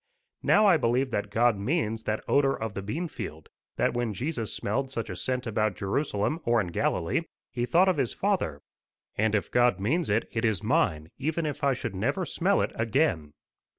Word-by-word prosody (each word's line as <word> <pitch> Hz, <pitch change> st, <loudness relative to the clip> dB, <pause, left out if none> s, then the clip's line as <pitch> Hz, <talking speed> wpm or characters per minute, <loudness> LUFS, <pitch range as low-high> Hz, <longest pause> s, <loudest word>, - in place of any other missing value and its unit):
Now 210 Hz, +1 st, +4 dB
I 190 Hz, -5 st, +6 dB
believe 125 Hz, +1 st, +1 dB
that 105 Hz, -1 st, -2 dB
God 115 Hz, +1 st, +3 dB
means 115 Hz, -2 st, 0 dB
that 110 Hz, 0 st, -1 dB
odour 135 Hz, -1 st, +3 dB
of 110 Hz, -2 st, -3 dB
the 100 Hz, -, -4 dB
bean 150 Hz, -, -3 dB
field; 80 Hz, -, -8 dB, 0.3 s
that -, -, +1 dB
when 120 Hz, -3 st, -1 dB
Jesus 125 Hz, -, -3 dB
smelled 130 Hz, +6 st, -2 dB
such 115 Hz, -4 st, -4 dB
a -, -, -5 dB
scent 125 Hz, -1 st, -2 dB
about 110 Hz, -3 st, 0 dB
Jerusalem 105 Hz, -, -1 dB
or 120 Hz, 0 st, +3 dB
in 95 Hz, -5 st, -1 dB
Galilee, 85 Hz, -, 0 dB, 0.3 s
he 120 Hz, 0 st, -2 dB
thought 180 Hz, +6 st, +4 dB
of 185 Hz, -, +2 dB
his 130 Hz, -5 st, +1 dB
Father. 185 Hz, -, -1 dB, 0.5 s
And 110 Hz, 0 st, +2 dB
if 105 Hz, -, -1 dB
God 120 Hz, -5 st, +3 dB
means 150 Hz, -, 0 dB
it, 105 Hz, +3 st, +1 dB
it 110 Hz, -1 st, -2 dB
is 110 Hz, -6 st, +1 dB
mine, 80 Hz, +1 st, +1 dB
even 160 Hz, +4 st, -1 dB
if 145 Hz, -2 st, -4 dB
I 140 Hz, -1 st, +4 dB
should 120 Hz, -4 st, -4 dB
never 120 Hz, -, -1 dB
smell 195 Hz, +4 st, +1 dB
it -, -, -2 dB
again. 110 Hz, -, 0 dB
120 Hz, 195 wpm, -28 LUFS, 105-145 Hz, 0.5 s, I